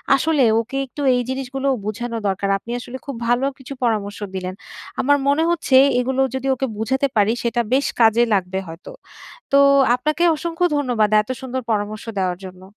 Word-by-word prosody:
আসলে 295 Hz, 0 st, +2 dB, 0.2 s
ওকে 235 Hz, +4 st, -4 dB
একটু 280 Hz, +3 st, -9 dB
এই 245 Hz, -, +1 dB
জিনিসগুলোও 270 Hz, +1 st, -2 dB
বোঝানো 230 Hz, +2 st, -4 dB
দরকার, 195 Hz, +1 st, -1 dB
আপনি 235 Hz, +4 st, -10 dB
আসলে 245 Hz, +1 st, -8 dB
খুব 280 Hz, -3 st, -5 dB
ভালো 245 Hz, +3 st, +2 dB
কিছু 265 Hz, +1 st, -9 dB
পরামর্শ 210 Hz, -3 st, -1 dB, 0.2 s
দিলেন। 185 Hz, 0 st, -4 dB, 0.5 s
আমার 285 Hz, +2 st, +3 dB
মনে 285 Hz, +3 st, +3 dB
হচ্ছে 335 Hz, -6 st, +1 dB, 0.2 s
এগুলো 265 Hz, +1 st, 0 dB
যদি 265 Hz, +1 st, -3 dB
ওকে 265 Hz, +1 st, -2 dB
বুঝাতে 265 Hz, +6 st, 0 dB
পারি 210 Hz, 0 st, +3 dB
সেটা 235 Hz, 0 st, 0 dB
বেশ 275 Hz, +2 st, +2 dB
কাজে 225 Hz, +1 st, +5 dB
লাগবে 190 Hz, -1 st, 0 dB
হয়তো, 165 Hz, +1 st, -10 dB, 0.6 s
তো 280 Hz, -, +6 dB, 0.4 s
আপনাকে 305 Hz, +7 st, -1 dB
অসংখ্য 340 Hz, +2 st, -2 dB
ধন্যবাদ 245 Hz, -7 st, +1 dB
এত 215 Hz, -, -15 dB
সুন্দর 260 Hz, -1 st, -4 dB
পরামর্শ 215 Hz, 0 st, -2 dB
দেওয়ার 185 Hz, -2 st, 0 dB
জন্য। 185 Hz, 0 st, -11 dB
245 Hz, 170 wpm, -20 LUFS, 210-270 Hz, 0.6 s, তো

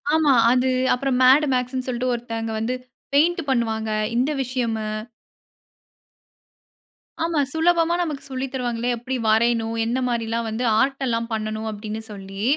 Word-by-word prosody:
ஆமா. 310 Hz, -3 st, +4 dB, 0.2 s
அது 255 Hz, +1 st, +2 dB, 0.2 s
அப்புறம் 255 Hz, 0 st, 0 dB
"மேட் 270 Hz, +4 st, +6 dB
மேக்ஸ்ன்னு" 255 Hz, +1 st, -1 dB
சொல்லிட்டு 250 Hz, 0 st, -1 dB
ஒருத்தங்க 230 Hz, -1 st, -4 dB
வந்து 235 Hz, +3 st, -1 dB, 0.4 s
பெயிண்ட் 335 Hz, +4 st, +3 dB
பண்ணுவாங்க. 220 Hz, -3 st, 0 dB, 0.3 s
இந்த 255 Hz, +5 st, +2 dB
விஷயம்மு. 230 Hz, -4 st, -2 dB, 2.4 s
ஆமா. 330 Hz, -2 st, 0 dB
சுலபமா 335 Hz, +1 st, +3 dB
நமக்கு 300 Hz, -4 st, -4 dB
சொல்லி 260 Hz, +1 st, -2 dB
தருவாங்களே! 245 Hz, -2 st, -2 dB
எப்படி 255 Hz, +3 st, -4 dB
வரையணும்? 225 Hz, 0 st, +2 dB
எந்த 245 Hz, +3 st, 0 dB
மாதிரிலாம் 230 Hz, -1 st, -1 dB
வந்து 220 Hz, +3 st, -3 dB, 0.2 s
ஆர்ட் 270 Hz, +1 st, +1 dB
எல்லாம் 230 Hz, -1 st, -1 dB
பண்ணணும் 215 Hz, 0 st, -3 dB
அப்படின்னு 215 Hz, +1 st, -5 dB
சொல்லி, 195 Hz, 0 st, -7 dB
245 Hz, 130 wpm, -23 LUFS, 225-265 Hz, 2.4 s, மேட்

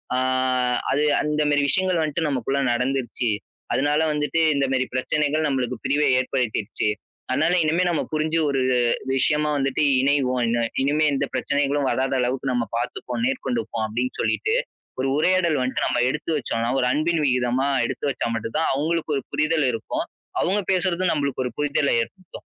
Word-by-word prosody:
"ஆ -, -, +1 dB, 0.7 s
அது 145 Hz, +2 st, +2 dB, 0.2 s
அந்த 150 Hz, 0 st, 0 dB
மேரி 145 Hz, 0 st, +3 dB
விஷயங்கள் 185 Hz, -3 st, +1 dB
வன்ட்டு 155 Hz, +1 st, -1 dB
நமக்குள்ள 135 Hz, +1 st, -1 dB
நடந்துடுச்சு. 125 Hz, -2 st, -1 dB, 0.4 s
அதனால 145 Hz, +3 st, +2 dB
வந்துட்டு 150 Hz, +2 st, 0 dB
இந்த 140 Hz, -1 st, +2 dB
மேரி 130 Hz, -1 st, +1 dB
பிரச்சனைகள் 150 Hz, +3 st, 0 dB
நம்பளுக்கு 125 Hz, -3 st, -1 dB
பிரிவ 145 Hz, +2 st, +1 dB, 0.2 s
ஏற்படுத்திடுச்சு. 120 Hz, -5 st, -1 dB, 0.4 s
அதனால 155 Hz, +7 st, +2 dB
இனிமே 165 Hz, +4 st, +2 dB
நம்ம 170 Hz, -, 0 dB
புரிஞ்சு 155 Hz, +1 st, +1 dB
ஒரு 135 Hz, -1 st, 0 dB, 0.5 s
விஷயமா 150 Hz, +3 st, +1 dB
வந்துட்டு 135 Hz, +2 st, 0 dB, 0.2 s
இணைவோம். 135 Hz, -3 st, +1 dB
இன 120 Hz, 0 st, +1 dB, 0.2 s
இனிமே 150 Hz, +3 st, +2 dB
எந்த 135 Hz, -, 0 dB
பிரச்சனைகளும் 140 Hz, +1 st, 0 dB
வராத 130 Hz, +1 st, 0 dB
அளவுக்கு 130 Hz, +2 st, -1 dB
நம்ம 120 Hz, -1 st, 0 dB
பார்த்துப்போம். 125 Hz, -, -4 dB
நேர்கொண்டுப்போம்." 245 Hz, -, -2 dB
அப்படின்னு 120 Hz, +4 st, -2 dB
சொல்லிட்டு, 435 Hz, +2 st, 0 dB, 0.4 s
ஒரு 135 Hz, -, 0 dB
உரையாடல் 170 Hz, -2 st, +2 dB
வன்ட்டு 125 Hz, +1 st, -1 dB
நம்ம 120 Hz, -, 0 dB
எடுத்து 150 Hz, +4 st, -4 dB
வச்சோம்ன்னா, 115 Hz, -3 st, -2 dB
ஒரு 125 Hz, -, +1 dB
அன்பின் 155 Hz, +2 st, +1 dB
விகிதமா 125 Hz, +1 st, +1 dB, 0.2 s
எடுத்து 145 Hz, -, -3 dB
வச்சா 130 Hz, -, -2 dB
மட்டும் 115 Hz, +3 st, -5 dB
தான் 160 Hz, -, +1 dB
அவங்களுக்கு 155 Hz, +2 st, -1 dB
ஒரு 135 Hz, -, -4 dB
புரிதல் 150 Hz, 0 st, +1 dB
இருக்கும். 115 Hz, -1 st, -3 dB, 0.4 s
அவுங்க 195 Hz, +4 st, +1 dB
பேசுறதும் 185 Hz, -1 st, +1 dB
நம்பளுக்கு 140 Hz, -3 st, -1 dB
ஒரு 125 Hz, -, -3 dB
புரிதல 145 Hz, -1 st, +1 dB
ஏற்படுத்தும். 185 Hz, +8 st, -9 dB
140 Hz, 155 wpm, -23 LUFS, 130-155 Hz, 0.7 s, மேரி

